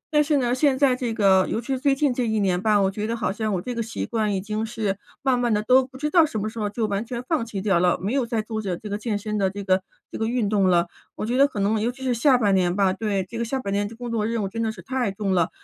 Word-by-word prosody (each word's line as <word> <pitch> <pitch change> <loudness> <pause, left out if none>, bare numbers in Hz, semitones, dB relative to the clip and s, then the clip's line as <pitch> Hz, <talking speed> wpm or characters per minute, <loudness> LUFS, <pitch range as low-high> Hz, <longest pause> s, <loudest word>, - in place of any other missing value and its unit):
但 300 - +6
是 295 -1 +2
呢， 245 -2 +1
现 265 0 +2
在 265 -2 +4
这 250 -2 -3
个， 195 -4 +4
尤 225 - -1
其 - - -9
是 265 -2 -1
最 275 0 +2
近 280 -2 +1
这 245 -1 -1
1 220 -1 0
年 185 -3 +1
吧， 215 0 +3
我 195 -1 +2
觉 210 +2 -3
得 230 - -1
好 220 -4 -1
像 215 +1 -2
我 185 - 0
这 245 +7 -5
个 230 - -2
习 225 0 -4
惯 220 -3 -1
已 - - 0
经 215 +2 -3
是 220 -3 -2 0.3
慢 260 -2 +2
慢 240 -2 +1
地 210 0 +1
都 255 +4 +5
不 260 - -13
知 300 +3 -1
道 335 -1 +6
什 225 -8 -2
么 210 - -2
时 220 +1 -6
候 210 - -1
就 220 +2 -2
完 200 +1 -1
全 240 +1 -5
放 310 -8 +1
弃 215 -4 -5
掉 195 -5 +3
了， 180 0 +3
没 200 +6 -2
有 270 -2 +2
在 230 -2 -2
做 220 0 -4
着 190 -4 -3 0.2
健 215 -2 -2
身 210 +1 -3
的 195 -1 +2
这 200 +1 -6
个 185 -1 +2 0.3
这 - - -6
个 220 - 0
运 235 -2 0
动 200 -3 +3
了。 175 -1 +3 0.3
我 - - -4
觉 240 +3 -1
得 275 +2 +5
可 210 - -6
能 210 +2 +1
尤 235 - 0
其 265 +1 -12
是 255 -1 +1
下 250 +2 +4
半 205 -4 +2
年 180 -2 +2
吧， 195 -2 +2
对， 200 -2 -1
这 230 +4 -6
个 235 - 0
下 265 +3 -2
半 200 -5 -3
年 205 0 0
的 225 - -10
工 245 0 -6
作 225 -2 0
任 230 -2 -1
务 - - -1
真 225 +4 -4
的 225 -1 0
是 - - -12
太 255 -5 -1
重 195 -1 -2
了， 175 -3 +2
220 Hz, 345 characters per minute, -24 LUFS, 200-245 Hz, 0.3 s, 但